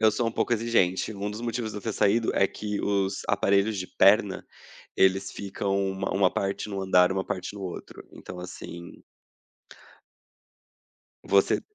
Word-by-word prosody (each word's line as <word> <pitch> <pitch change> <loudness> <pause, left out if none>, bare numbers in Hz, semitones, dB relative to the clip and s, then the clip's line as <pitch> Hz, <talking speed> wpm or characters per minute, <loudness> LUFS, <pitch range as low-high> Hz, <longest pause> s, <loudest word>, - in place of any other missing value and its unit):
eu 110 -1 +5
sou 115 +1 0
um - - -3
pouco - - 0
exigente, 110 -4 +1
um 100 0 -4
dos 105 +2 -6
motivos 115 -2 -3
de - - -7
eu - - -12
ter 110 - -2
saído 110 +3 +2
é 95 - +3
que 105 0 -4
os 95 -1 0
aparelhos 100 +1 +2
de 90 - -3
perna, 100 +1 +3 0.5
eles 95 +1 +3
ficam 100 0 -3
uma 95 0 -3
uma 95 -1 +4
parte 100 +2 -2
num 100 -1 -4
andar, 90 -1 +4
uma 95 0 -1
parte 100 0 -4
no 100 - -8
outro. 90 -2 -8
Então 90 - -10
assim 85 -1 -9 2.3
você 100 -1 +3
100 Hz, 165 wpm, -26 LUFS, 95-105 Hz, 2.3 s, eu